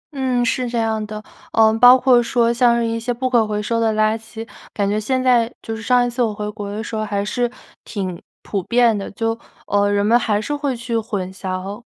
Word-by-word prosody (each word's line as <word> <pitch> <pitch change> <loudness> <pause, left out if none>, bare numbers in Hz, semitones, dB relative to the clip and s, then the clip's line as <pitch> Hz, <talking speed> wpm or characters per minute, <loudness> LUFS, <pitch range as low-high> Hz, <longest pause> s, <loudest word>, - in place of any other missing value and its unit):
嗯， 255 -2 0
是 245 +1 -1
这 240 - -3
样 220 -1 0
的。 215 0 -7 0.3
嗯， 220 0 +4
包 250 +2 +9
括 250 -2 +4
说 235 0 +1
像 240 0 +3
是 235 - 0
一 230 0 -2
些 245 +2 -3
不 255 +2 -2
可 235 -4 +2
回 210 -1 -2
收 230 +2 -1
的 225 -1 +1
垃 215 0 +2
圾， 225 0 -9 0.2
感 200 -1 -1
觉 210 +1 0
现 255 +4 -1
在 245 -2 +3
就 225 - -4
是 220 - -8
上 245 +1 +3
一 245 - -1
次 245 +1 -3
我 225 - +2
回 210 0 -5
国 205 -1 -7
的 215 +2 -4
时 225 - -6
候 215 - -1
还 205 -1 -2
是 240 +3 -1 0.3
挺 185 -5 -5 0.2
普 200 -2 -3
遍 235 +3 +3
的， 200 -1 -5
就， 225 +2 -2 0.3
呃， 205 0 +1
人 205 0 +1
们 230 +3 +5
还 210 -4 0
是 290 +7 -3
会 285 -3 -2
去 235 0 -4
混 205 -5 -3
淆， 190 +3 -5
225 Hz, 255 characters per minute, -20 LUFS, 210-240 Hz, 0.3 s, 包